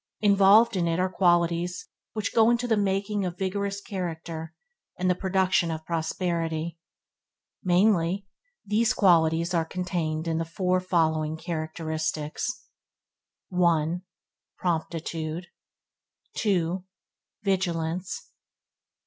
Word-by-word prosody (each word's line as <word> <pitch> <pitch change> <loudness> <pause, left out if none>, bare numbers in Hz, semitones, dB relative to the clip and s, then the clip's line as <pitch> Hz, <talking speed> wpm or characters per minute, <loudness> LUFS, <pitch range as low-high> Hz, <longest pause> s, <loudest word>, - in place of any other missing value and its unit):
Involved 205 +2 +6
in 175 -2 +1
it 165 0 +1
are 185 0 +1
qualities 175 -1 +1 0.3
which 215 -2 -2
go 230 +1 +5
to 245 +1 -3
the 225 - +3
making 200 0 0
of 180 -1 -3
vigorous 200 +1 -2
character 165 -4 -5 0.4
and 185 - 0
the 180 - +4
production 185 -2 +1
of 160 -1 -4
prosperity. 165 -1 -2 0.8
Mainly, 185 0 +3 0.4
these 215 +2 +2
qualities 170 -2 +4
are 165 -2 +2
contained 165 -2 -2
in 165 0 0
the - - 0
four 180 +2 0
following 160 -4 +1
characteristics: 160 0 -3 1.0
1. 170 -2 +2 0.6
Promptitude 165 -1 -2 0.9
2. 180 -4 0 0.6
Vigilance 180 -2 -1
3. - - -43
175 Hz, 105 wpm, -27 LUFS, 165-195 Hz, 1.0 s, Involved